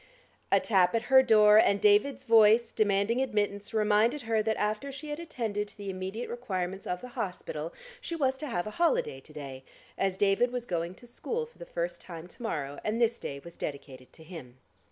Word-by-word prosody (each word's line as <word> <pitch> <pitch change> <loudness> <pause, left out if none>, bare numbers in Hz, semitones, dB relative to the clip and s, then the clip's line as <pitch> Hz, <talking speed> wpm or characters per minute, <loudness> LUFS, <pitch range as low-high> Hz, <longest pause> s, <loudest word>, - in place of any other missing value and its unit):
A - - +6
tap 190 -2 +3
at 230 - 0
her 265 - +10
door, 215 -4 +6
and 200 -2 +4
David's 210 +7 +3
voice 225 -1 +5
demanding 210 +3 +1
admittance 205 -5 -1
reminded 220 +5 +2
her 225 -1 +1
that 220 0 -1
after 215 +6 -2
she 285 +3 -8
had 295 - -4
attended 225 -11 -3
to - - -12
the 200 -1 -5
immediate 190 +5 -5
requirements 190 -6 -4
of 180 0 -3
the 250 - -8
hospital, 170 -7 -5 0.3
she 335 - -4
was 265 -4 +1
to 305 - -4
have 175 -9 -2
a 215 - -5
holiday 150 - +2
to 145 - -18
day, 135 -3 -8 0.4
as 195 -1 0
David 205 +5 +2
was 250 -1 -4
going 175 -2 -3
to 245 - -16
school 460 - -4
for 470 - -22
the - - -9
first - - -4
time 170 -1 -9
to - - -16
morrow, 145 -11 -3
and 215 +2 -1
this 235 0 +2
day 140 - -5
was 170 0 -12
dedicated 130 -3 -7
to 160 - -15
him. 155 -7 -11
210 Hz, 205 wpm, -29 LUFS, 180-240 Hz, 0.4 s, her